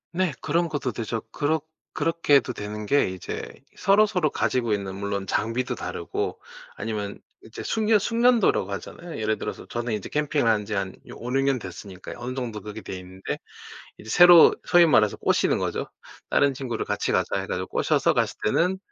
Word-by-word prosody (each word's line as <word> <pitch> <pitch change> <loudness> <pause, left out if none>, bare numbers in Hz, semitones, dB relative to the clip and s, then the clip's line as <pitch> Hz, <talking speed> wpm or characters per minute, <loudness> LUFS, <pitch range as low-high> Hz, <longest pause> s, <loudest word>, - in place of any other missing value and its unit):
네. 180 -3 0
그런 170 +3 +1
것도 145 -5 -2
되죠. 115 0 -3
그렇 155 +2 0 0.3
그렇게 165 -1 +2
해도 135 -5 +3
되는 105 +1 -6
게 140 -1 +3
이제 95 -1 -6 0.2
서로서로 195 -5 +3
가지고 125 -4 0
있는 100 -2 -3
물론 100 0 -3
장비도 115 +6 -1
다르고 - - -4 0.4
아니면 105 -1 -4 0.3
이제 - - -9
숙려 220 -1 +2
숙련도라고 230 - +3
하잖아요. 170 - -7
예를 110 0 0
들어서 - - -6
저는 120 -1 -3
이제 105 -2 -3
캠핑을 150 -3 0
한 105 -2 0
지 110 - -5
한 95 -2 -2
이 - - -12
5-6년 135 +2 0
됐으니까요. 95 -4 -9
어느 125 +1 -4
정도 120 -5 -4
그렇게 105 +1 -8
돼있는데 95 0 -6 0.6
이제 110 - -12
새로 175 +1 +8
소위 175 0 +6
말해서 110 -9 +4
꼬시는 - - +2
거죠. - - -2 0.4
다른 140 -1 +3
친구를 125 -4 -3
"같이 105 0 -1
가자." - - +1
해 - - -5
가지고 - - -3
꼬셔서 - - +2
갔을 - - 0
때는 180 - +2
125 Hz, 380 characters per minute, -25 LUFS, 105-160 Hz, 0.6 s, 새로